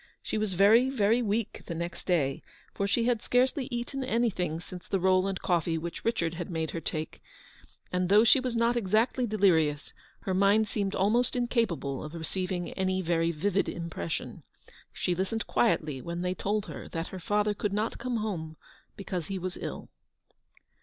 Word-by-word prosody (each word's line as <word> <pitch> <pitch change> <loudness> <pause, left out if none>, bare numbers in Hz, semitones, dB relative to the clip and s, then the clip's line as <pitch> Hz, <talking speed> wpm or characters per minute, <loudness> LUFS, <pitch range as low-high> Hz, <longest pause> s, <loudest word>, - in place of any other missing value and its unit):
She 215 - -2
was 210 -3 -1
very, 220 +7 +6
very 230 -2 +3
weak 220 -1 -1
the 170 - -4
next 170 +1 -5
day, 145 -7 +1 0.3
for 200 - -1
she 225 +4 +2
had 235 -2 +1
scarcely 255 +2 +1
eaten 245 +2 -3
anything 215 -10 0
since 180 +1 -10
the 195 - 0
roll 185 +1 +3
and 195 -1 -2
coffee 170 -2 +1
which 170 +1 -5
Richard 175 -8 0
had 170 0 -5
made 160 -2 -2
her 165 - -4
take; 155 0 -4 0.7
and 180 0 +1
though 210 +2 +7
she 235 +4 +6
was 255 -2 -2
not 230 +1 +3
154 235 -5 -2
exactly 230 +5 +2
delirious, 165 -9 +2 0.3
her 190 - -2
mind 200 +3 +4
seemed 200 -2 -2
almost 230 +7 +2
in 245 -1 +1
capable 170 - -1
of 155 +2 -7
receiving 180 +2 -3
any 190 0 -1
very 165 -1 +1
vivid 185 +5 0
impression. 165 - -4 0.5
She 180 - -1
listened 195 +5 -2
quietly 155 - +1
when 170 +3 -4
they 180 0 0
told 205 +2 -1
her - - -8
that 165 0 -4
her 190 - -7
father 210 +3 +1
could 205 0 -2
not 210 +3 -1
come 245 -1 -1
home 165 -8 -3 0.4
because 180 -5 -4
he 195 - -3
was 185 0 -4
ill. - - -6
190 Hz, 180 wpm, -29 LUFS, 170-220 Hz, 0.7 s, though